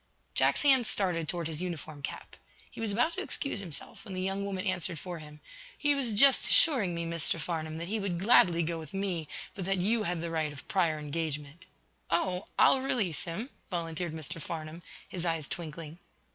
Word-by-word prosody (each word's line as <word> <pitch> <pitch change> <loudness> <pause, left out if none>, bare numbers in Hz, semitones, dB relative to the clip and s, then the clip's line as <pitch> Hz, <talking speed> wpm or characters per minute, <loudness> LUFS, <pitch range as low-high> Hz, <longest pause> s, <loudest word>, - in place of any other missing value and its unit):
Jack's - - +3
hand 265 -5 +6
started 170 -5 0
toward 175 -2 -1
his 160 0 -4
uniform 160 -4 -5
cap. - - -6 0.4
He - - -8
was 220 -2 +1
about 245 +11 +2
to 380 - -3
excuse 280 - -2
himself, 175 -7 -4
when 195 -4 -7
the 185 - -2
young 195 +1 -1
woman 195 -1 -3
answered 185 -3 -1
for 175 +1 -6
him: 150 -1 -12 0.4
"He 290 -1 +3
was 265 -6 0
just 270 +5 +7
assuring 225 - +5
me, 170 0 -2
Mr. 165 0 +2
Farnum, 160 -1 -3
that 170 +1 -4
he 215 +3 -1
would 195 -4 -1
gladly 180 -5 +5
go 165 +1 -2
with 155 +2 -9
me, 185 -5 -2 0.3
but 190 - -5
that 195 +1 +1
you 215 +6 +2
had 175 -4 -1
the 170 0 -3
right 155 -2 0
of 145 - -12
prior 170 -5 +2
engagement." 150 +2 -4 0.4
"Oh, 180 +2 0
I'll 265 - +6
release, 215 - 0
him," 205 +11 -4 0.2
volunteered 170 -1 -3
Mr. 160 0 -6
Farnum, 160 +1 -6 0.3
his 175 - -5
eyes 165 -4 -1
twinkling. 160 -1 -6
175 Hz, 195 wpm, -30 LUFS, 160-200 Hz, 0.4 s, just